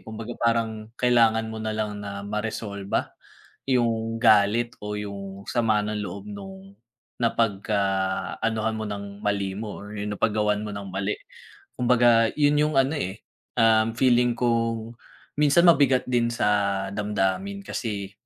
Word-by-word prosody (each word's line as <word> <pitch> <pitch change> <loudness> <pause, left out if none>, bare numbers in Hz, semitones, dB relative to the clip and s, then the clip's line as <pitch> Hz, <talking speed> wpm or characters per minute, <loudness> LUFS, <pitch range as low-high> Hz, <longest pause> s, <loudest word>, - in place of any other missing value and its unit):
kumbaga 110 +2 -7
parang 115 -1 -1
kailangan 115 -2 +3
mo 110 - -6
nalang 110 -1 -2
na 100 0 -6
maresolba 105 -2 -3 0.5
yung 115 -3 0
galit 110 +1 +4
o 105 - -4
yung 100 -1 -7
sama 115 -3 +2
ng 105 0 -2
loob 100 +2 -7
nung 95 -1 -10 0.4
napagka 110 -3 0 0.6
anuhan 110 0 0
mo 110 - -4
ng 100 0 -7
mali 100 -2 -1
mo 105 -1 -6
or 105 +1 -9
yung 105 +1 -3
napag 110 0 +1
gawan 105 -1 +1
mo 105 - -5
ng 100 -1 -6
mali. 95 +2 -1 0.6
Kumbaga 120 -2 +4
yun 150 0 +3
yung 150 0 +1
ano 135 +3 +3
eh, 95 0 -5 0.3
um, 115 0 +4
feeling 120 -1 +3
kung 115 -2 0 0.5
minsan 150 +4 +5
mabigat 135 -6 +5
din 120 -2 +1
sa 100 -3 +1
damdamin 105 - -1
kasi 100 - -4
110 Hz, 140 wpm, -25 LUFS, 100-120 Hz, 0.6 s, minsan